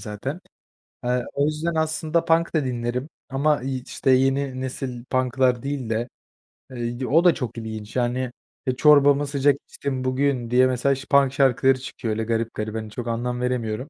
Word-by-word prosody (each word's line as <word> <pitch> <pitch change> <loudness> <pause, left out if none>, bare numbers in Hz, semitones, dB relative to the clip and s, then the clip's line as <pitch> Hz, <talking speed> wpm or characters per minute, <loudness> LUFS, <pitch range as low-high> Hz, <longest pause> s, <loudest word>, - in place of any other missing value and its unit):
zaten. 130 - -5 0.6
Eee, 125 0 0
o 140 +1 +1
yüzden 155 +2 -1
aslında 160 +1 0
punk 165 +1 +2
da 150 -4 +2
dinlerim 125 +3 -3 0.2
ama, 140 0 +1
iii, 130 -1 -3
işte, 130 - 0
yeni 135 0 +2
nesil 130 -2 -5
punk'lar 130 -1 +1
değil 135 -5 -3
de, 115 +2 -1 0.6
eee, 120 +1 -4
o 165 +6 +4
da 175 - +7
çok 120 -4 -5
ilginç. 110 -1 -7
Yani, 125 0 0 0.4
eee, 130 - +1
çorbamı 145 0 +5
sıcak 140 0 +3
içtim 130 -2 -4
bugün 130 -2 0
diye, 130 +1 +5
mesela, 130 +2 +1
şa 135 - -9
punk 140 -1 +5
şarkıları 135 -1 +3
çıkıyor, 120 -3 -5
öyle 110 +1 -2
garip 115 0 -1
garip, 110 0 -4
hani, 110 -1 -4
çok 120 +2 -6
anlam 125 +1 -2
veremiyorum. 125 +1 -2
130 Hz, 175 wpm, -23 LUFS, 120-140 Hz, 0.6 s, da